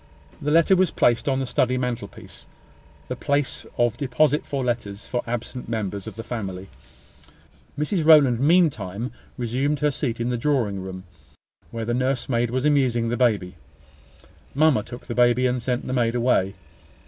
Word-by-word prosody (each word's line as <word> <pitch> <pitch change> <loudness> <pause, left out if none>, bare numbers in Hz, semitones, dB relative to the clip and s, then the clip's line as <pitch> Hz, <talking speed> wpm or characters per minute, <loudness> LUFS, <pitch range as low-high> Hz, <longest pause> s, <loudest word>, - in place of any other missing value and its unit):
The 145 - -1
letter 165 +4 +5
was 185 -2 +3
placed 120 +1 +2
on 135 -1 +1
the 135 - -1
study 125 0 +1
mantelpiece; 120 -5 -5 0.6
the - - -3
place 140 -1 -1
of 120 -2 +1
deposit 150 +3 +1
for 140 -2 -2
letters 115 -4 -3
for 125 - -1
absent 120 +1 -5
members 100 -4 -3
of - - -7
the 115 - -6
family. 95 -6 -5 1.1
Mrs 155 +4 0
Rowland 145 -7 +6
meantime 130 - +1 0.3
resumed 130 +4 -1
her 150 0 +3
seat 125 -4 -3
in 120 +1 -1
the 125 - -1
drawing 115 -8 0
room, 95 0 -7 0.7
where 115 -1 -5
the 120 - -1
nursemaid 125 -2 0
was 130 +3 -1
amusing 130 -6 +2
the 120 - 0
baby. 105 -8 +1 1.0
Mamma 150 -5 +4
took 120 +3 -10
the 120 - -4
baby, 120 +1 +3
and 125 0 0
sent 125 +1 -2
the 130 - -3
maid 120 -2 +1
away. 115 -6 +1
125 Hz, 160 wpm, -24 LUFS, 115-140 Hz, 1.1 s, Rowland